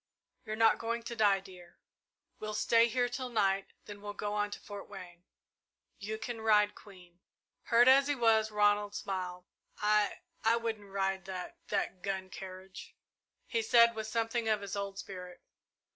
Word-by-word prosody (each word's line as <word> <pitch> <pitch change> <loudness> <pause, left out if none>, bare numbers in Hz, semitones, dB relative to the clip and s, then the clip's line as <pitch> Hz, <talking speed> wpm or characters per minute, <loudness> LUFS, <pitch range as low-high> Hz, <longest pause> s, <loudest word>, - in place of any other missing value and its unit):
"You're 215 -1 -3
not 225 0 +4
going 230 0 -2
to 235 - -6
die, 205 -3 +4
dear. 180 -2 -14 0.6
We'll 215 0 -4
stay 230 +2 +4
here 245 +1 +1
till 250 +1 -4
night, 195 -4 +1 0.2
then 205 -1 -10
we'll 205 0 -6
go 205 0 -3
on 205 0 0
to - - -7
Fort 205 -1 -9
Wayne. 180 -3 -11 0.7
You 215 +2 -4
can 225 +1 -5
ride 210 -2 +4
Queen." 180 -4 -16 0.5
Hurt 235 +1 +5
as 275 +2 +7
he 290 - +1
was, 225 -3 +3
Ronald 205 -1 +2
smiled. 180 -2 -4 0.3
"I 210 0 +1 0.2
I 225 +1 +4
wouldn't 220 -3 -4
ride 195 -1 -1
that 185 -1 -7
that 185 - -2
gun 190 -1 -3
carriage," 185 0 -10 0.5
he 230 - -1
said 235 +1 +6
with 220 -1 -5
something 225 +1 -1
of 215 -1 +2
his 200 0 -5
old 200 -1 -4
spirit. 180 -2 -9
210 Hz, 165 wpm, -32 LUFS, 195-225 Hz, 0.7 s, as